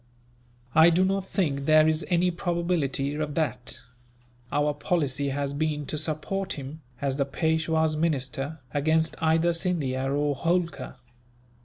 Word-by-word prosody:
"I 160 +2 +7
do 180 +2 +3
not 195 0 -1
think 140 -9 -1
there 155 0 +6
is 160 0 +1
any 180 0 +2
probability 170 -6 -1
of 150 -1 -3
that. 130 -5 -2 0.7
Our 145 0 +1
policy 145 -2 -1
has 140 0 -2
been 150 0 -1
to - - -4
support 155 +5 -2
him, 145 +3 -8 0.2
as 135 -1 0
the 140 - +1
Peishwa's 160 +1 +1
minister, 145 -1 -2
against 160 +2 +2
either 160 +2 +3
Scindia 140 -7 -1
or 145 +1 +1
Holkar. 170 +2 -1
155 Hz, 135 wpm, -26 LUFS, 140-170 Hz, 0.7 s, I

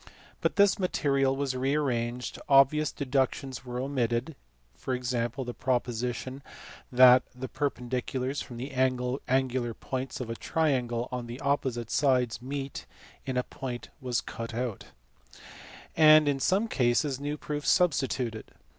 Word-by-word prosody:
But - - 0
this 200 -1 +4
material 140 -7 +1
was 135 -1 -2
re 135 +3 0
arranged, 125 -4 -2
obvious 140 +2 +5
deductions 135 -1 -1
were 125 -1 -5
omitted 130 +1 -1 0.6
(e.g. - - +1 0.2
the 120 +1 -3
proposition 125 +1 -2 0.5
that 125 0 +8
the 130 +1 -5
perpendiculars 130 0 -2
from 120 - -8
the 130 +4 -5
angular 130 -1 0
points 130 0 -4
of 120 -3 -4
a - - -3
triangle 125 -6 0
on 125 -1 -4
the 120 +3 -7
opposite 130 -5 -1
sides 125 -5 +2
meet 135 +1 -5 0.4
in 130 -1 -1
a 125 - +2
point 125 -2 -6
was 125 -3 -1
cut 115 -1 -6
out), 120 -3 -3 1.1
and 155 -1 +7
in 140 -1 +1
some 195 +10 +2
cases 130 - +1
new 145 +1 -3
proofs 145 -1 -3
substituted. 135 - +1
130 Hz, 130 wpm, -28 LUFS, 125-140 Hz, 1.1 s, that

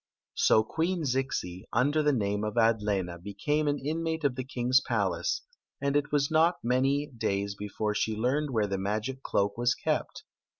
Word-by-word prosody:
So 110 - +4
Queen 165 +8 -1
Zixi, 125 -9 -2
under 145 +6 +2
the 150 -1 +3
name 105 -5 0
of 105 -1 -3
Adlena. 105 -6 +1
became 145 - -1
an 145 0 +1
mmate 160 +3 -2
of 140 -3 +2
die 130 - -4
kings 130 0 +2
palace; - - -1 0.4
and 140 0 0
it. 145 0 +3 0.3
lot 165 +3 +4
many 135 +4 +2
days 100 -3 -1
before 105 +1 -3
she 110 +1 0
learned 135 +7 0
where 110 -5 +1
the 100 -1 -2
ma^,., 110 +7 -2
cloak 100 -1 0
was 120 0 +2
kept. - - -2
120 Hz, 165 wpm, -29 LUFS, 105-145 Hz, 0.4 s, So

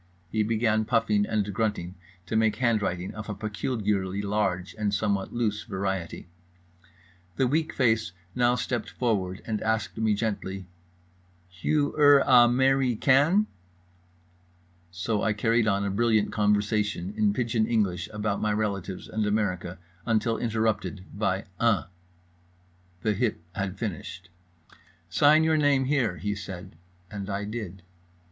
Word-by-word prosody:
He 110 - +1
began, 110 0 +1
puffing 105 -2 +1
and 105 -2 -1
grunting, 105 -5 -1 0.3
to 100 - -4
make 110 -1 +3
handwriting 105 -7 0
of 110 +1 -7
a 105 - -3
peculiarly 105 -3 -2
large 100 -3 -1
and 105 -1 0
somewhat 100 -1 -1
loose 110 -3 -1
variety. 95 -4 -4 1.1
The 130 - +2
weak 155 +5 0
face 110 -7 +1 0.2
now 120 0 +3
stepped 125 -2 -2
forward, 100 -6 -1
and 110 -2 -2
asked 110 0 -1
me 110 -2 +2
gently: 100 -3 -3 0.8
"Hugh 145 - 0
er 145 -1 +7
a 125 -2 +7
merry 130 0 +2
can?"—so 150 - +3 1.7
I 110 - +1
carried 115 +2 +2
on 100 -1 +1
a 100 - -1
brilliant 110 0 +2
conversation 105 -2 0
in 105 -1 +2
pidgeon 115 0 0
English 95 -7 0
about 105 -1 -2
my 105 - +1
relatives 100 -3 -3
and 110 -1 -1
America 95 -4 -1 0.3
until 115 0 +1
interrupted 110 -4 -1
by 100 -2 -1
"Uh." 115 -4 +3 1.2
The 110 - +2
hip 110 +2 -1
had 95 -1 -3
finished. 95 -2 -6 0.8
"Sign 150 +9 +5
your 160 0 +3
name, 145 -3 +3
here," 125 -10 +1
he 105 +6 -2
said, 95 -2 -8 0.4
and 100 -1 -6
I 100 +1 -2
did. 100 -4 -6
105 Hz, 130 wpm, -27 LUFS, 100-115 Hz, 1.7 s, er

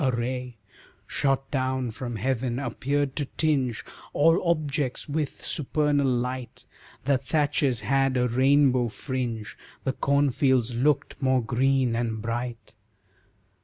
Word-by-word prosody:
A 135 - +3
ray, 125 0 -3 0.5
Shot 135 -1 0
down 130 -2 -1
from 120 +1 -5
heaven, 125 +2 -1
appeared 140 +2 -1
to 145 - 0
tinge 135 -7 +1 0.3
All 165 +4 +4
objects 145 -5 -1
with 150 -1 -3
supernal 145 -1 +1
light, 125 0 -2 0.4
The 135 -1 +3
thatches 140 -3 +1
had 135 +4 +2
a 125 0 +2
rainbow 130 0 +4
fringe, 120 -2 -4 0.3
The 130 - 0
cornfields 135 -4 +2
looked 140 +5 0
more 130 -2 +2
green 130 +1 +2
and 115 -2 -1
bright. 115 0 -4
130 Hz, 120 wpm, -26 LUFS, 120-140 Hz, 0.5 s, All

